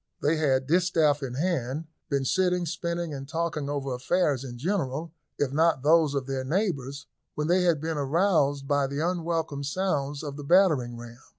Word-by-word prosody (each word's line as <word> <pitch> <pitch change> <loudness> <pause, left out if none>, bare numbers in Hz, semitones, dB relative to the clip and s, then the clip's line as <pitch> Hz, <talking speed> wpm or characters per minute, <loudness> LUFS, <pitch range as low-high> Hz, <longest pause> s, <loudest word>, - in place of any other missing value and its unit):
They 155 +3 +1
had, 135 -4 +2
distaff 160 -3 +2
in 125 -3 -4
hand, 150 -2 -1 0.2
been 140 -2 0
sitting, 180 +2 +1
spinning, 170 0 -3
and 135 0 -7
talking 160 -3 -2
over 140 -2 -2
affairs 140 +1 0
in 120 -3 -7
general, 160 -1 -2 0.2
if 140 -2 0
not 160 -3 +2
those 155 -1 +4
of 135 -2 -1
their 135 -1 -3
neighbours, 145 - -2 0.3
when 150 - -1
they 180 +3 +3
had 170 -4 +3
been 160 0 -3
aroused 145 -2 +1
by 145 -1 +2
the 140 +1 -4
unwelcome 165 -5 -2
sounds 145 -3 -1
of 145 -1 -6
the 145 - -7
battering 145 -8 +3
ram. 120 +1 -11
150 Hz, 175 wpm, -27 LUFS, 135-170 Hz, 0.3 s, those